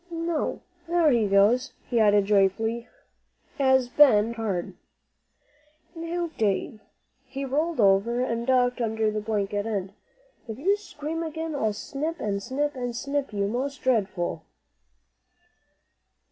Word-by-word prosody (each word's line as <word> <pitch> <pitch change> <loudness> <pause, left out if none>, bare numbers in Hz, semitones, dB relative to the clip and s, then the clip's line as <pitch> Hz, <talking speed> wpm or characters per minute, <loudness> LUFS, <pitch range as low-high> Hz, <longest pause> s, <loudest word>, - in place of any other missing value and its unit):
"No, 335 -1 -2 0.2
there 335 -3 +3
he 230 -4 +2
goes!" 210 +7 +3
he 240 - +1
added 205 -2 +4
joyfully, 210 +4 +1 0.7
as 265 -2 +4
Ben 240 -5 +5
breathed 235 - -7
hard. 200 -6 -2 1.2
"Now, 335 0 -3
Dave," 210 0 0 0.4
he 270 +1 -6
rolled 305 +3 -1
over 205 +4 +3
and 235 -1 -2
ducked 250 -1 +2
under 220 -1 0
the 215 0 -3
blanket 205 -1 -2
end, 195 -3 -3 0.5
"if 220 - -6
you 380 +9 +2
scream 325 -5 -6
again, 320 0 -4
I'll 220 -7 0
snip, 295 +9 -4
and 200 -3 -2
snip, 290 +6 -2
and 245 -2 -4
snip 280 +2 -2
you, 200 -1 -1
most 260 +5 -3
dreadful." 190 -9 0
240 Hz, 130 wpm, -26 LUFS, 210-290 Hz, 1.2 s, Ben